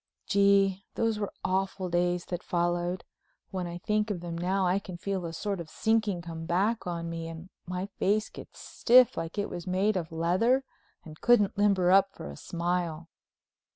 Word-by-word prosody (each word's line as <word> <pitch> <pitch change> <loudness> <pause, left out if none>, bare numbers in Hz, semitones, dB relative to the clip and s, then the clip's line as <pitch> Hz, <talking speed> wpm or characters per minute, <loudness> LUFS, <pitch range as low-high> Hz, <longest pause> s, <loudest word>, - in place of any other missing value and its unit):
Gee, 200 -1 +3
those 225 -2 0
were 205 - -2
awful 190 0 -1
days 175 0 0
that 175 -1 -4
followed! 175 +1 -1 0.5
When 185 -2 -3
I 170 0 -5
think 210 +3 0
of 200 -4 -2
them 170 -1 -5
now 185 +3 0
I 180 +2 +2
can 185 -3 -8
feel 190 0 -3
a - - -5
sort 195 +3 -3
of 165 -2 -7
sinking 215 -5 0
come 165 -1 -7
back 200 +5 +1
on 170 -1 -3
me 165 0 -4
and 165 +3 -9 0.2
my 180 +1 -3
face 210 +2 +2
gets - - -12
stiff 250 0 +4
like 165 +4 -5
it 205 - 0
was 175 -1 -7
made 195 +3 +1
of 170 -2 -3
leather 185 +11 +2 0.4
and 155 -1 -12
couldn't 210 -5 +4
limber 200 -3 +3
up 195 0 +4
for 70 - -7
a - - -9
smile. 170 - -3
185 Hz, 185 wpm, -29 LUFS, 170-200 Hz, 0.5 s, stiff